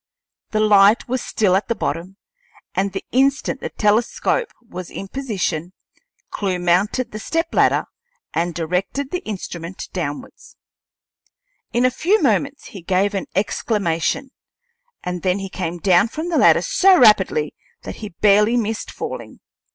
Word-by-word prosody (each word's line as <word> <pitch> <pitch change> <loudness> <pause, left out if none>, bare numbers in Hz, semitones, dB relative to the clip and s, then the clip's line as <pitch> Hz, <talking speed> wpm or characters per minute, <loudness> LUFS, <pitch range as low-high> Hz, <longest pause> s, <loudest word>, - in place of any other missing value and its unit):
The 215 - -1
light 210 0 +5
was 255 0 -1
still 195 -4 +1
at 195 - 0
the 230 - 0
bottom, 180 +1 -4 0.6
and 195 +2 0
the 195 - -5
instant 270 +1 +1
the - - -4
telescope 230 - +1
was 185 -7 -9
in 195 - -7
position 190 - -3 0.6
Clewe 190 -3 -1
mounted 180 +8 +1
the 215 - -6
stepladder 330 +8 +1 0.5
and 170 0 -1
directed 180 - -2
the 360 0 -3
instrument 180 -3 -6
downward. 145 -6 -4 1.4
In 240 +1 +2
a 255 - +3
few 370 - +2
moments 280 - 0
he 200 -7 -10
gave 190 +4 +1
an 195 - -3
exclamation, 200 - -1 0.7
and 180 -1 -4
then 185 +2 +1
he 195 -1 -5
came 175 -2 -4
down 180 +3 +4
from 315 +8 -5
the 335 - +1
ladder - - +5
so 380 -1 +5
rapidly 190 - +4 0.3
that - - -7
he 210 - -7
barely 210 +5 +3
missed 225 -1 -2
falling. - - -7
205 Hz, 145 wpm, -20 LUFS, 180-245 Hz, 1.4 s, light